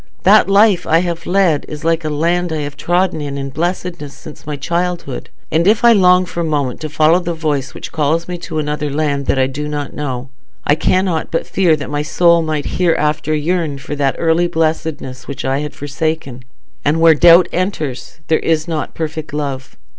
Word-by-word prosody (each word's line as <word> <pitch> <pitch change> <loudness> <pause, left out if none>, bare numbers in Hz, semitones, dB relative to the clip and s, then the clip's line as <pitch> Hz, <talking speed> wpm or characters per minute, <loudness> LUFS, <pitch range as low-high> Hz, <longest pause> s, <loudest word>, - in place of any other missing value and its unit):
That 200 +1 +5
life 195 -3 +4
I 165 - +4
have 170 -2 -4
led 180 -5 +2
is 150 +1 -7
like 165 0 +1
a 155 - -2
land 170 +3 0
I 155 -1 -2
have 145 0 -5
trodden 175 +2 0
in 140 -1 -4
blessedness 170 -2 -3
since 155 -1 -13
my 150 - -3
childhood; 170 -1 -3 0.2
and 165 +3 +2
if 215 +3 +3
I 235 - +8
long 180 -2 +5
for 175 - -7
a - - +1
moment 145 -5 -2
to 155 - -4
follow 155 +3 +3
the 175 -1 -3
voice 145 -4 -2
which - - -8
calls 160 +2 0
me 180 -1 -5
to 165 -2 -6
another 150 0 -2
land 140 -1 -1
that - - +1
I 130 - +3
know 145 +1 -4
not, 130 -3 -4 0.4
I - - +4
cannot 180 +1 0
but 165 - -1
fear 180 -5 +2
that 145 -1 -7
my 145 0 -1
soul 170 +2 +3
might 155 -2 -2 0.2
hereafter 155 -2 +1
yearn 155 -1 -1
for 140 +2 -6
that 140 -2 0
early 165 +1 +2
blessedness 160 -5 -2
which 140 - -6
I 135 +1 0
had 150 0 -5
forsaken; 145 -3 -4 0.4
and 150 +3 +1
where 165 0 +7
doubt 170 +3 +6
enters 160 -6 -3
there 160 - +2
is 160 0 0
not 160 -3 -3
perfect 160 -1 -5
love. 140 -3 -4
155 Hz, 195 wpm, -17 LUFS, 145-170 Hz, 0.4 s, I